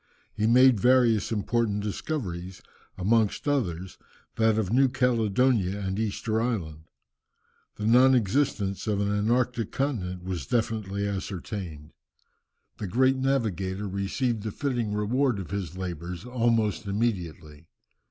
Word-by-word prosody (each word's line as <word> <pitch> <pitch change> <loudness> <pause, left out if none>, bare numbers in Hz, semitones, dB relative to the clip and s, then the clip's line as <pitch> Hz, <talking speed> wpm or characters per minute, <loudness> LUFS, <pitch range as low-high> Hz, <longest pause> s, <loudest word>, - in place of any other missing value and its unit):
He 110 - 0
made 125 -1 +6
various 120 -2 +3
important 105 -1 0
discoveries, 95 - -4 0.3
amongst 110 +6 +1
others, 95 - -1 0.4
that 110 -1 +3
of 110 -1 -1
New 135 +1 +4
Caledonia 120 -5 +1
and 95 0 -3
Easter 110 +1 -1
Island. 80 -11 -3 0.9
The 105 - -5
non 125 +4 +6
existence 110 -4 0
of 105 -2 +1
an 100 0 0
antarctic 115 +2 0
continent 95 -11 -2
was 90 -7 -4
definitely 105 -3 -1
ascertained. 95 -5 -5 0.9
The 105 - -3
great 130 +7 +3
navigator 105 -8 -1
received 105 +5 -1
the 110 - -3
fitting 120 -4 -2
reward 120 +3 +1
of 95 -3 -7
his 95 -4 -4
labours 90 -1 -5
almost 115 -5 0
immediately. 85 -8 -3
105 Hz, 120 wpm, -27 LUFS, 95-120 Hz, 0.9 s, made